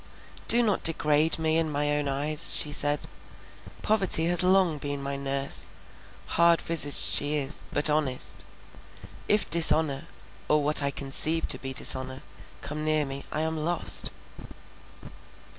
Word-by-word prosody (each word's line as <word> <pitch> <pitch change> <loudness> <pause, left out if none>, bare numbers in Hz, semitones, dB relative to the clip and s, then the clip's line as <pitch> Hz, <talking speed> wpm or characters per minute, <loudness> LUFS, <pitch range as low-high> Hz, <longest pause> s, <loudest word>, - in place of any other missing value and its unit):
"Do 240 +1 +5
not 210 -4 0
degrade 155 -1 +3
me 160 0 +1
in 160 -1 -1
my 145 0 -1
own 145 -1 -2
eyes," 145 +2 -1
she 150 - +1
said; 145 0 -2 0.8
"poverty 195 -6 +2
has 175 0 +1
long 180 -4 +3
been 145 0 -4
my 140 0 -4
nurse; 140 0 -4 0.6
hard 170 0 +3
visaged 155 -4 -1
she 145 +1 +2
is, 140 -1 -5
but 145 - +3
honest. 150 -4 -2 0.8
If 210 0 +1
dishonour, 155 -4 +1 0.4
or 150 -1 +3
what 150 +1 +3
I 140 - 0
conceive 140 +4 +1
to - - +3
be 135 - -6
dishonour, 130 0 -1 0.4
come 155 +1 -6
near 155 -1 +1
me, 135 0 -7
I 155 - -2
am 160 0 -2
lost." 175 +1 0
150 Hz, 140 wpm, -27 LUFS, 140-165 Hz, 0.8 s, Do